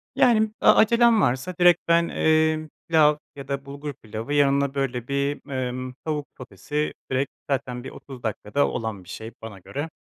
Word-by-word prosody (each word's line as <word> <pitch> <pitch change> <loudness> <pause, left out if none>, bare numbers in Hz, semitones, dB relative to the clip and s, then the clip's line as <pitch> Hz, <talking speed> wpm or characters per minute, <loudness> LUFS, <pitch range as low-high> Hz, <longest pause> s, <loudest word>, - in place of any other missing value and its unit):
Yani, 220 -3 +5 0.2
e - - -3
acelem 235 -1 +6
varsa 130 +9 0
direkt 175 -1 +5
ben, 170 0 +4
eee, 155 -1 +2 0.2
pilav 150 -2 +5 0.2
ya 140 -1 -9
da 140 0 -3
bulgur 145 +1 -6
pilavı, 110 +3 -6
yanına 140 -1 +3
böyle 125 -3 -2
bir, 140 +1 -2
emm, 130 -1 -3
tavuk 150 -2 -2
sotesi. 130 +6 -4 0.2
Direkt 135 +1 0 0.2
zaten 125 -3 -2
bir 130 - -6
30 130 -3 -11
dakikada 110 +5 0
olan 110 -5 -4
bir 90 - -17
şey 110 +3 -7
bana 110 -4 -9
göre. 145 - -5
140 Hz, 170 wpm, -24 LUFS, 125-155 Hz, 0.2 s, acelem